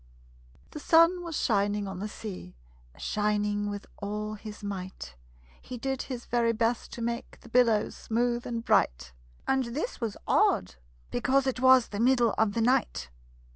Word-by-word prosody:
The 300 Hz, -, -7 dB
sun 335 Hz, +4 st, +5 dB
was 335 Hz, -3 st, -4 dB
shining 205 Hz, -2 st, +1 dB
on 190 Hz, -1 st, -6 dB
the 210 Hz, -, -3 dB
sea, 195 Hz, -, -8 dB, 0.4 s
Shining 205 Hz, 0 st, 0 dB
with 205 Hz, 0 st, -6 dB
all 210 Hz, +1 st, -4 dB
his 215 Hz, 0 st, -9 dB
might; 185 Hz, -, -6 dB, 0.5 s
He 250 Hz, -, -7 dB
did 265 Hz, +2 st, -2 dB
his 250 Hz, -3 st, -6 dB
very 235 Hz, -1 st, +1 dB
best 230 Hz, +1 st, -1 dB
to 235 Hz, -, -5 dB
make 235 Hz, +1 st, -4 dB
The 235 Hz, -, -14 dB
billows 230 Hz, -3 st, +3 dB
smooth 240 Hz, +1 st, -1 dB
and 230 Hz, -1 st, -4 dB
bright -, -, +1 dB, 0.3 s
And 265 Hz, -1 st, +2 dB
this 335 Hz, -, -3 dB
was 225 Hz, -4 st, -3 dB
odd, -, -, +2 dB, 0.4 s
because 270 Hz, 0 st, +2 dB
it 260 Hz, -1 st, -1 dB
was 260 Hz, -1 st, +6 dB
The 205 Hz, -, -5 dB
middle 240 Hz, -2 st, +3 dB
of 220 Hz, -2 st, +2 dB
the 230 Hz, -, 0 dB
night. 240 Hz, -, +1 dB
230 Hz, 160 wpm, -28 LUFS, 205-250 Hz, 0.5 s, was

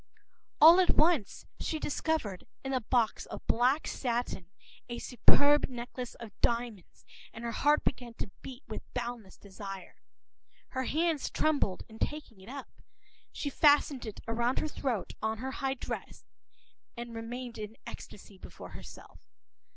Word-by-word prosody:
” -, -, -45 dB
All 330 Hz, +4 st, +11 dB
at 370 Hz, -, +4 dB
once 310 Hz, -, +3 dB
she 320 Hz, -, -1 dB
discovered, 295 Hz, -, -1 dB, 0.2 s
in 270 Hz, 0 st, -2 dB
a 260 Hz, -, +2 dB
box 230 Hz, 0 st, +1 dB
of -, -, -8 dB
black 255 Hz, +6 st, +3 dB
satin, 235 Hz, -8 st, -2 dB, 0.4 s
a 240 Hz, -, -3 dB
superb 285 Hz, +5 st, +5 dB
necklace 245 Hz, 0 st, -6 dB
of 230 Hz, -3 st, -9 dB
diamonds, 235 Hz, -5 st, -1 dB, 0.3 s
and 230 Hz, -, -9 dB
her 235 Hz, -, -1 dB
heart 295 Hz, +6 st, +3 dB
began 240 Hz, -2 st, -2 dB
to 195 Hz, -, -4 dB
beat 265 Hz, +1 st, -8 dB
with -, -, -5 dB
boundless 240 Hz, -5 st, -4 dB
desire. 195 Hz, -2 st, -8 dB, 0.7 s
Her 260 Hz, 0 st, -2 dB
hands 320 Hz, 0 st, +1 dB
trembled 285 Hz, -12 st, +1 dB
in 220 Hz, 0 st, -13 dB
taking 295 Hz, -10 st, -3 dB
it 190 Hz, -, -12 dB
up. 275 Hz, 0 st, -7 dB, 0.6 s
She 285 Hz, -, -3 dB
fastened 290 Hz, -3 st, +4 dB
it 215 Hz, -, -7 dB
round 235 Hz, +3 st, +1 dB
her -, -, +1 dB
throat, 255 Hz, -8 st, -2 dB
on 220 Hz, 0 st, 0 dB
her 260 Hz, +4 st, -3 dB
high 270 Hz, 0 st, -1 dB
dress, -, -, -6 dB, 0.7 s
and 235 Hz, 0 st, -5 dB
remained 235 Hz, +1 st, -5 dB
in 215 Hz, +1 st, -6 dB
ecstasy 195 Hz, -1 st, -10 dB
before -, -, -10 dB
herself. -, -, -11 dB
245 Hz, 150 wpm, -31 LUFS, 225-280 Hz, 0.7 s, All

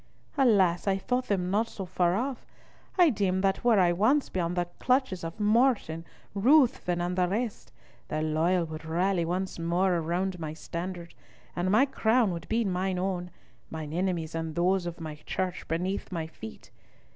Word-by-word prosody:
Alas! 200 Hz, -, +3 dB
I 195 Hz, -1 st, +3 dB
thought 250 Hz, +5 st, -1 dB
them 185 Hz, -3 st, 0 dB
not 215 Hz, +3 st, +2 dB
so 195 Hz, -4 st, -7 dB
far 180 Hz, -1 st, +1 dB
off. 255 Hz, +4 st, -2 dB, 0.5 s
I 350 Hz, -4 st, +6 dB
deemed 190 Hz, -4 st, 0 dB
that 195 Hz, 0 st, +1 dB
were 235 Hz, -4 st, +5 dB
I 175 Hz, -2 st, +4 dB
once 240 Hz, +11 st, +2 dB
beyond 175 Hz, -1 st, -2 dB
the 175 Hz, -, +1 dB
clutches 255 Hz, -8 st, +1 dB
of 165 Hz, +5 st, -6 dB
Morton, 210 Hz, -7 st, +2 dB, 0.3 s
Ruthven, 230 Hz, -, +3 dB
and 175 Hz, +1 st, -1 dB
the 180 Hz, -1 st, +2 dB
rest, 200 Hz, -, -3 dB, 0.4 s
the 155 Hz, 0 st, -2 dB
loyal 165 Hz, +3 st, +1 dB
would 155 Hz, 0 st, -8 dB
rally 175 Hz, +2 st, 0 dB
once 180 Hz, +2 st, -3 dB
more 175 Hz, +1 st, +1 dB
round 180 Hz, +3 st, -2 dB
my 155 Hz, -1 st, -5 dB
standard, 170 Hz, +1 st, -6 dB, 0.4 s
and 180 Hz, +1 st, 0 dB
my 220 Hz, +8 st, +5 dB
crown 230 Hz, -5 st, +2 dB
would 170 Hz, -1 st, -6 dB
be 225 Hz, +1 st, +1 dB
mine 185 Hz, 0 st, -1 dB
own, 180 Hz, -1 st, -2 dB, 0.4 s
mine 155 Hz, -1 st, -6 dB
enemies 175 Hz, -2 st, -1 dB
and 165 Hz, -1 st, -4 dB
those 180 Hz, +1 st, +1 dB
of 175 Hz, 0 st, -6 dB
my 155 Hz, -2 st, -6 dB
Church 185 Hz, -1 st, -3 dB
beneath 180 Hz, +6 st, -2 dB
my 165 Hz, -3 st, -2 dB
feet. 110 Hz, -9 st, -11 dB
185 Hz, 170 wpm, -28 LUFS, 170-205 Hz, 0.5 s, I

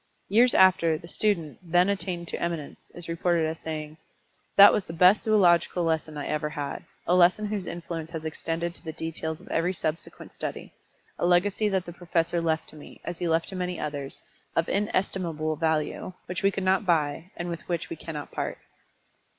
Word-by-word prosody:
Years 235 Hz, +5 st, +5 dB
after, 185 Hz, -4 st, +5 dB
the 170 Hz, -, -12 dB
student, 170 Hz, -6 st, 0 dB
then 175 Hz, +1 st, +3 dB
attained 185 Hz, -4 st, -2 dB
to -, -, -4 dB
eminence, 170 Hz, -4 st, -4 dB
is 175 Hz, -1 st, -8 dB
reported 170 Hz, 0 st, +1 dB
as 160 Hz, +1 st, -3 dB
saying: 155 Hz, -1 st, -5 dB, 0.6 s
"That 200 Hz, 0 st, +10 dB
was 205 Hz, -, +1 dB
the 165 Hz, -, -7 dB
best 180 Hz, +5 st, +6 dB
zoological 180 Hz, -5 st, +4 dB
lesson 160 Hz, -2 st, -1 dB
I 145 Hz, -, -4 dB
ever 150 Hz, 0 st, -1 dB
had 145 Hz, -2 st, -5 dB, 0.2 s
a 175 Hz, -, +2 dB
lesson 180 Hz, +4 st, +5 dB
whose 205 Hz, -4 st, -3 dB
influence 165 Hz, -2 st, -5 dB
has 160 Hz, -1 st, -6 dB
extended 165 Hz, +2 st, -2 dB
to -, -, -10 dB
the 160 Hz, -, -5 dB
details 160 Hz, -1 st, -3 dB
of -, -, -16 dB
every 175 Hz, +3 st, +1 dB
subsequent 160 Hz, -2 st, -4 dB
study; -, -, -6 dB, 0.5 s
a -, -, +1 dB
legacy 200 Hz, +4 st, +3 dB
that 190 Hz, -2 st, 0 dB
the 175 Hz, -, -8 dB
professor 170 Hz, -1 st, 0 dB
left 160 Hz, -1 st, 0 dB
to -, -, -14 dB
me, 150 Hz, -, -12 dB
as 175 Hz, -, -5 dB
he 175 Hz, -, -1 dB
left 165 Hz, 0 st, +1 dB
to 195 Hz, -, -6 dB
many 180 Hz, -1 st, -3 dB
others, 145 Hz, -2 st, -4 dB, 0.4 s
of 165 Hz, -, +2 dB
inestimable 180 Hz, -6 st, -1 dB
value, 160 Hz, +3 st, -1 dB
which 180 Hz, +2 st, -4 dB
we 195 Hz, -, +4 dB
could 195 Hz, 0 st, -3 dB
not 190 Hz, +2 st, +3 dB
buy, 160 Hz, -2 st, 0 dB
and 175 Hz, -, -3 dB
with 170 Hz, -1 st, -4 dB
which 170 Hz, -1 st, -2 dB
we -, -, -2 dB
cannot 155 Hz, -2 st, -7 dB
part." -, -, -3 dB
170 Hz, 190 wpm, -27 LUFS, 160-185 Hz, 0.6 s, That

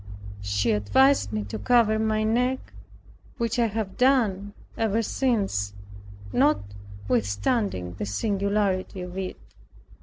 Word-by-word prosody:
She 100 Hz, +3 st, 0 dB
advised 105 Hz, +1 st, +3 dB
me 105 Hz, -1 st, -2 dB
to 100 Hz, -, -6 dB
cover 230 Hz, -3 st, +3 dB
my 215 Hz, 0 st, +1 dB
neck, 250 Hz, +4 st, 0 dB, 0.6 s
which 230 Hz, 0 st, -1 dB
I 235 Hz, -, +4 dB
have 215 Hz, -3 st, -4 dB
done 220 Hz, -7 st, +2 dB, 0.2 s
ever 225 Hz, 0 st, +1 dB
since 200 Hz, -, 0 dB, 0.6 s
notwithstanding 100 Hz, -, -1 dB
the 105 Hz, -, -2 dB
singularity 200 Hz, -, -1 dB
of 180 Hz, 0 st, -7 dB
it. 190 Hz, -1 st, -4 dB
195 Hz, 110 wpm, -25 LUFS, -, 0.6 s, I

